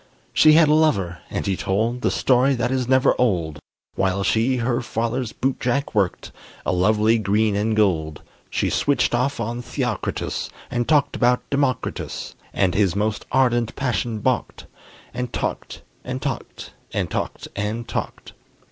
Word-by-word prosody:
She 155 -1 +6
had 160 0 +6
a 150 - +4
lover, 100 - +2
and - - -3
he 95 - 0
told 115 +7 -1
The - - +2
story 130 +1 +3
that 120 +1 -1
is 130 -2 0
never 130 0 +4
old, 85 -11 0 0.3
While 95 0 0
she 115 +6 +2
her 120 +1 0
father's 115 +1 -2
bootjack 135 +1 -1
worked 100 -5 0 0.3
A - - +1
lovely 105 +5 +3
green 105 +1 +1
and 110 +2 0
gold. 80 -8 +1 0.3
She - - 0
switched 140 -5 +1
off 125 +3 0
on 120 +2 -3
Theocritus, 125 -3 -3 0.2
And 120 -1 -1
talked 145 -2 +3
about 125 0 +2
Democritus; 140 -2 -2 0.2
And 95 -2 +1
his 100 -2 +2
most 105 +1 -1
ardent 120 -3 +2
passion 120 -4 -1
balked, - - -1 0.5
And 125 -1 -3
talked - - -4 0.2
and - - -4
talked - - -5 0.2
and - - -1
talked - - -3
and 105 +3 -3
talked. - - -5
115 Hz, 150 wpm, -22 LUFS, 105-130 Hz, 0.5 s, She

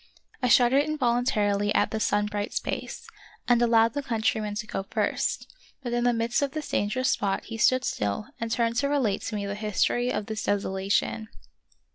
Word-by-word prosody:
I 250 - +2
shuddered 250 +3 +5
invol 265 -6 +1
untarily 205 -4 +1
at - - +2
the 220 - -2
sun 205 -1 +1
bright 210 +1 -3
space, - - -4 0.4
and 240 -1 +4
allowed 230 -1 +4
the 285 - -2
countryman 220 -4 -1
to 215 +1 -4
go 205 - -3
first; 195 - -1 0.4
but 240 -2 -3
in 240 0 +1
the 245 - +4
midst 235 +5 0
of 280 -1 -1
this 310 -1 -5
dangerous 255 +6 0
spot 200 -7 0
he 225 - -6
stood 255 +3 +3
still 105 - -2
and 230 - -3
turned 230 0 0
to 280 +2 +1
relate 250 -9 +1
to 220 - -4
me 205 -1 -3
the 200 - -3
history 215 +4 0
of 210 - -2
this 220 0 -4
desolation. 190 - -1
225 Hz, 190 wpm, -26 LUFS, 205-245 Hz, 0.4 s, shuddered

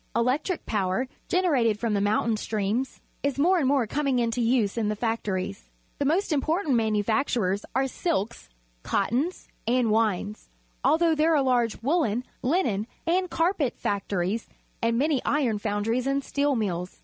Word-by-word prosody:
Electric 260 +10 0
power, 195 +3 0 0.2
generated 270 - +2
from 230 -2 0
the 200 - +1
mountain 215 +2 +1
streams, 215 +4 -2 0.2
is 280 -1 -1
more 355 +6 +4
and 275 - +1
more 270 -3 +3
coming 275 +3 0
into 235 0 0
use 230 -3 +2
in 220 -3 0
the 215 - -1
factories. 200 -4 -3 0.3
The 285 - 0
most 340 +7 +1
important 310 +1 +1
manufactures 220 -2 +1
are 265 +1 +3
silks, 235 - -2 0.3
ci; - - -1
tt(ins, 290 +10 -1 0.2
nnd 240 -2 +2
wiues, 215 -1 0 0.4
although 330 +1 +4
there 315 +1 +3
are 280 - +3
lar^e 240 -4 +1
wcdllcn, 255 -4 +1 0.2
linen, 245 - 0 0.2
and 360 +2 +1
cjitpat 330 -6 0
factories 200 +1 -2 0.3
and 230 0 +1
many 285 0 +2
iroji 245 -8 0
foimdries 225 +5 -1
and 275 0 0
steel 285 0 0
jjiilb?. 180 -5 -2
240 Hz, 150 wpm, -26 LUFS, 210-285 Hz, 0.4 s, more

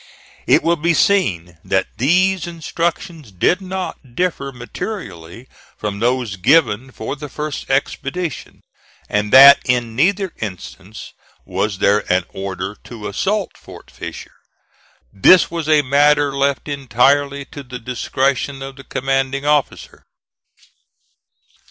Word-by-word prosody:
It - - +4
will 170 +1 +2
be 165 +2 +1
seen 90 - +1
that - - 0
these 180 +6 +2
instructions 170 - -4
did 135 - +1
not 185 -9 -6
differ 170 -6 -1
materially 120 - -8 0.3
from 105 -1 -4
those 120 -3 -1
given 130 - +2
for 115 +3 -5
the 150 0 -8
first 150 0 -5
expedition, 140 +3 -3 0.5
and 105 0 -1
that 140 +2 +10
in 120 -2 -1
neither 185 - +1
instance 100 0 -8 0.3
was 95 +2 -2
there 105 0 +1
an 90 -1 +2
order 95 +1 -5
to 110 -3 -8
assault 200 - -1
Fort - - -14
Fisher. - - -9 0.8
This 170 - +5
was 165 -2 -3
a 150 -1 +4
matter 145 +1 +3
left 140 -1 0
entirely 140 +1 +1
to 145 - -7
the 125 -2 -8
discretion 135 +3 -2
of 135 0 -9
the 135 - -11
commanding 135 +1 -2
officer. 150 -1 -1
135 Hz, 120 wpm, -18 LUFS, 110-155 Hz, 0.8 s, that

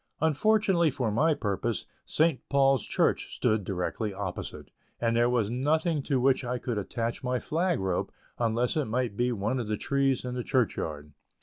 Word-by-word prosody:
Unfortunately 175 +2 +3
for 125 -5 -1
my 155 +8 +3
purpose, 105 0 -2 0.2
St. 160 -3 +2
Paul's 135 -3 +3
Church - - 0
stood 110 -1 +1
directly 95 +3 -3
opposite, 95 -2 -6 0.3
and 115 -1 +1
there 120 +1 +4
was 115 -4 +1
nothing 155 +5 +1
to 135 -1 0
which 130 +1 +3
I 125 0 -2
could 120 -3 -2
attach 115 +4 -3
my 125 0 0
flag 170 +6 0
rope, 95 -2 -1 0.3
unless 120 +1 +1
it 155 -3 +1
might 115 -1 -1
be 120 +3 +1
one 115 +3 -1
of 115 - -3
the 105 0 -1
trees 135 0 +1
in 125 - -3
the 125 -1 -3
church 125 -4 +1
yard. 75 -1 -5
125 Hz, 180 wpm, -28 LUFS, 110-140 Hz, 0.3 s, there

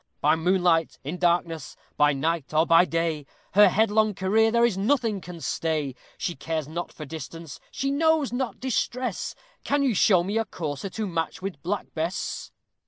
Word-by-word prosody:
By 150 +2 +4
moonlight, 175 -1 +2
in 155 +6 -5
darkness, 170 -2 0 0.2
by 145 0 +4
night, 155 +1 -2
or 160 +1 +5
by 165 +2 +6
day, 165 -4 -1 0.2
Her 205 0 +7
headlong 215 +1 +2
career 215 +5 +3
there 235 +1 +4
is 235 -5 +1
nothing 215 -1 +1
can 175 0 -9
stay; 155 -5 -1 0.2
She 175 - -2
cares 155 +1 -3
not 170 +3 -5
for 150 - -8
distance, 160 0 -8
she 275 0 -2
knows 310 -2 +2
not 245 -4 -2
distress: 250 -3 -2 0.3
Can 285 0 +1
you 260 -4 +2
show 185 -3 +4
me 205 +5 -1
a 225 - 0
courser 150 0 -5
to 215 +3 -3
match 165 -1 -3
with 190 -8 -5
Black 195 +5 -3
Bess? 165 +4 -3
180 Hz, 170 wpm, -26 LUFS, 160-220 Hz, 0.3 s, Her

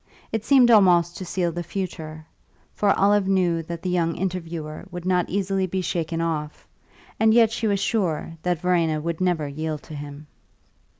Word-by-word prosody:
It 220 -1 -2
seemed 250 -2 +5
almost 175 -5 +5
to 185 - -6
seal 175 -1 -1
the 175 +1 -4
future; 160 -4 -6 0.5
for 205 - +1
Olive 200 0 +3
knew 180 -4 +2
that 165 +1 -7
the 185 - -1
young 165 -2 0
interviewer 170 -4 -4
would 175 0 -7
not 180 -1 +1
easily 195 0 0
be 185 +1 -2
shaken 165 -2 -2
off, 155 -2 -3 0.5
and 220 0 +4
yet 230 -2 +5
she 225 -1 -1
was 200 -1 +1
sure 180 -6 -1
that 175 -1 -1
Verena 170 -4 +1
would 165 +2 -4
never 175 -5 +1
yield 155 +1 -4
to - - -11
him. 145 0 -8
175 Hz, 175 wpm, -24 LUFS, 160-195 Hz, 0.5 s, seemed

